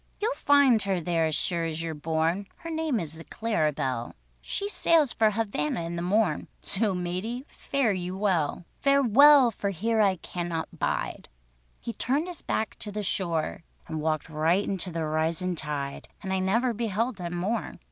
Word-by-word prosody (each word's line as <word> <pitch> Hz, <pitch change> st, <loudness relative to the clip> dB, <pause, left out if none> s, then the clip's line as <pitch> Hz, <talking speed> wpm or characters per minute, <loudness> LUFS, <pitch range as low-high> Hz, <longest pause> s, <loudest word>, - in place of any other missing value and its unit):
"You'll 445 Hz, +4 st, 0 dB
find 285 Hz, -, +4 dB
her 195 Hz, -2 st, 0 dB
there 165 Hz, -1 st, +1 dB
as 155 Hz, -, -1 dB
sure 170 Hz, +2 st, 0 dB
as 165 Hz, 0 st, -3 dB
you're 165 Hz, -1 st, -3 dB
born; 160 Hz, +5 st, -1 dB
Her 330 Hz, -, -8 dB
name 315 Hz, -6 st, 0 dB
is 160 Hz, -1 st, -3 dB
the -, -, -8 dB
Clara 190 Hz, -10 st, 0 dB
Belle, 130 Hz, -4 st, -3 dB, 0.3 s
She 400 Hz, -, -1 dB
sails 330 Hz, -8 st, +3 dB
for 220 Hz, -2 st, +4 dB
Havanna 200 Hz, -7 st, -1 dB
in 170 Hz, +1 st, -4 dB
the 170 Hz, -, -3 dB
morn, 205 Hz, +5 st, +1 dB, 0.2 s
So, 205 Hz, -1 st, +1 dB
matey—fare 220 Hz, +7 st, -2 dB
you 185 Hz, 0 st, -4 dB
well! 180 Hz, -5 st, 0 dB
"Farewell—for 275 Hz, -4 st, +5 dB
here 220 Hz, +4 st, 0 dB
I 195 Hz, -2 st, +4 dB
cannot 170 Hz, -1 st, -5 dB
bide." -, -, -2 dB, 0.5 s
He 230 Hz, -, -5 dB
turned 275 Hz, +9 st, 0 dB
his 360 Hz, -2 st, -6 dB
back 220 Hz, -, -2 dB
to 210 Hz, -, -1 dB
the 210 Hz, +1 st, -3 dB
shore, 170 Hz, -6 st, -1 dB, 0.3 s
And 155 Hz, -1 st, -4 dB
walked 155 Hz, -1 st, -1 dB
right 160 Hz, +5 st, +1 dB
into 190 Hz, -2 st, -1 dB
the 165 Hz, -1 st, -2 dB
risin' 160 Hz, +4 st, 0 dB
tide, 145 Hz, -3 st, -3 dB, 0.2 s
And 190 Hz, -1 st, -2 dB
I 190 Hz, -, +1 dB
never 230 Hz, +7 st, +1 dB
beheld 225 Hz, 0 st, -1 dB
him 175 Hz, 0 st, -4 dB
more. 205 Hz, +6 st, -2 dB
190 Hz, 170 wpm, -27 LUFS, 165-230 Hz, 0.5 s, Farewell—for